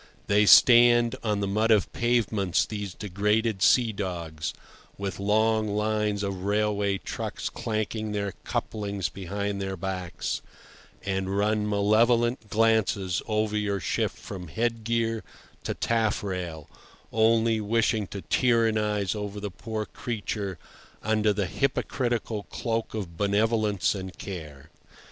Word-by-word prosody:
They 105 +1 +3
stand 120 -1 +7
on 105 -2 0
the 100 - 0
mud 110 +3 +1
of 105 -4 +3
pavements, 110 -6 +1
these 105 -4 -5
degraded 105 +1 0
sea 120 +1 +5
dogs, 85 -7 -4 0.5
with 100 -1 -4
long 110 +2 +2
lines 105 -1 0
of 100 -2 -3
railway 100 -1 +1
trucks - - -5
clanking 110 0 -3
their 100 -1 -2
couplings 100 -5 -2
behind 100 +1 -4
their 95 0 -3
backs, 90 -2 -3 0.6
and 95 0 -1
run 105 0 +1
malevolent 115 +3 +2
glances 105 -4 +2
over 110 -1 0
your 105 -2 0
ship - - 0
from 90 -3 -9
headgear 115 +2 -1 0.4
to - - -2
taffrail, 95 -8 -1 0.5
only 115 0 +3
wishing 110 -1 +1
to 100 - -7
tyrannize 110 -5 +2
over 105 -1 -5
the 100 -1 -5
poor 110 +2 -4
creature 105 -5 -4 0.5
under 110 -1 +2
the 100 -1 0
hypocritical 120 0 -1
cloak 115 -2 -2
of 90 -6 -5
benevolence 105 0 +1
and 95 -2 -7
care. 75 -8 -8
105 Hz, 120 wpm, -27 LUFS, 100-110 Hz, 0.6 s, stand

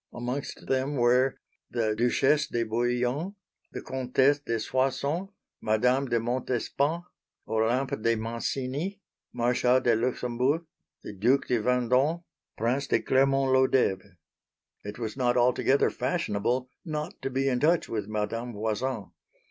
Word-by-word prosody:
Amongst 125 +3 -5
them 135 +2 0
were 125 +1 +3 0.3
the 110 -3 0
Duchesse 135 +6 +2
de 120 - -1
Bouillon, 120 - -1 0.4
the - - -7
Comtesse 130 +2 +2
de 115 -5 -2
Soissons, 135 - -1 0.3
Madame 125 +5 +2
de 120 -1 +1
Montespan, 130 +6 -1 0.4
Olympe 115 +3 0
de 115 +1 +2
Mancini, 130 - -3 0.3
Marshal 125 +1 +2
de 120 -3 +2
Luxembourg, 125 +6 0 0.4
the - - -7
Duc 120 +8 +2
de 120 - +1
Vendôme, 125 +7 +2 0.3
Prince 125 +5 0
de - - +2
Clermont 135 0 +2
Lodeve. 105 -8 +2 0.7
It 105 +1 -7
was 115 -2 -4
not 125 -2 +1
altogether 125 +3 +3
fashionable 125 +5 -1
not 155 0 -5
to - - -2
be 135 +1 0
in 125 -2 +1
touch 165 +4 +2
with 105 -3 -3
Madame 110 +3 -3
Voisin. 110 +1 -3
125 Hz, 125 wpm, -28 LUFS, 115-135 Hz, 0.7 s, were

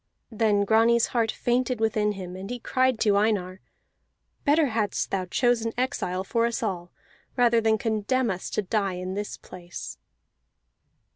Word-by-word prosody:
Then 210 -2 +2
Grani's 230 +2 +4
heart 230 -3 +2
fainted 245 0 0
within 215 -1 +1
him, 185 -2 -7
and 190 +2 -7
he 245 - -3
cried 255 0 +1
to 205 -3 +3
Einar: 195 -3 0 0.8
"Better 300 +2 +4
hadst 215 -3 -1
thou 190 -1 -1
chosen 230 +3 +1
exile 215 -8 -1
for 230 +4 +1
us 235 0 -3
all, 180 -5 -3 0.5
rather 235 -2 +4
than 220 0 +3
condemn 225 +2 0
us 185 0 -5
to 215 - -1
die 195 0 0
in 185 +1 -4
this 205 +1 -4
place!" 175 -1 -9
220 Hz, 150 wpm, -26 LUFS, 195-235 Hz, 0.8 s, Grani's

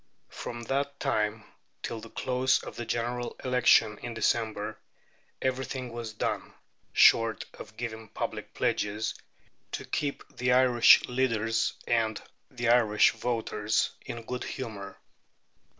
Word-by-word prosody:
From 120 0 -6
that 140 +3 -2
time 110 -5 0 0.4
till 115 - -3
the 115 - -10
close 130 +2 +1
of - - -8
the 120 - -5
General 120 +1 -2
Election 120 -4 +4
in 120 -1 -6
December 110 -2 0 0.6
everything 130 -1 -2
was 115 -2 -5
done, - - -3 0.4
short 115 -1 +5
of 110 - -11
giving 110 -2 -5
public - - -5
pledges, 105 +2 0 0.6
to - - -4
keep 145 -1 -2
the 125 0 +2
Irish 125 -2 +7
leaders 115 -3 +1
and 110 -2 +1 0.3
the 120 -3 -2
Irish 110 -3 +5
voters 110 -2 -1
in 120 -1 -6
good 125 +2 -4
humour. 105 -7 -6
120 Hz, 120 wpm, -29 LUFS, 110-125 Hz, 0.6 s, Irish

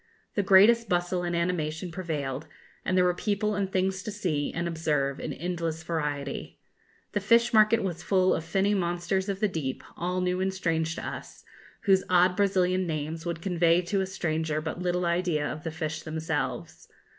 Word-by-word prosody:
The 205 - +1
greatest 205 +5 +6
bustle 175 0 +1
and 175 -1 -2
animation 170 -1 -1
prevailed, 150 -5 -4 0.4
and 185 - 0
there 180 - +5
were 180 - +3
people 210 +3 -1
and 200 -2 -1
things 190 0 0
to 215 - -6
see 175 -9 -1
and 170 +1 -2
observe 150 -5 0
in - - -4
endless 165 -2 -3
variety. 145 -4 -3 0.5
The 205 - 0
fish 235 +4 +3
market 215 +1 +5
was 175 -3 -3
full 185 -1 +3
of 160 - -2
finny 195 +5 +1
monsters 175 +1 -1
of 195 -1 -3
the 215 - +4
deep, 150 -8 -4
all 180 +1 -2
new 180 0 0
and 190 0 +1
strange 165 -3 -1
to - - -5
us, - - -8 0.4
whose 195 -3 +4
odd 180 0 +4
Brazilian 185 -2 +2
names 160 +1 -3
would 170 -1 -4
convey 175 -2 +3
to 195 +2 0
a 190 - -1
stranger 160 -4 -1
but 160 +3 -4
little 180 0 0
idea 170 -3 +1
of 155 - -6
the 165 - -2
fish 155 -1 -4
themselves. 160 -1 -3
175 Hz, 180 wpm, -28 LUFS, 160-190 Hz, 0.5 s, greatest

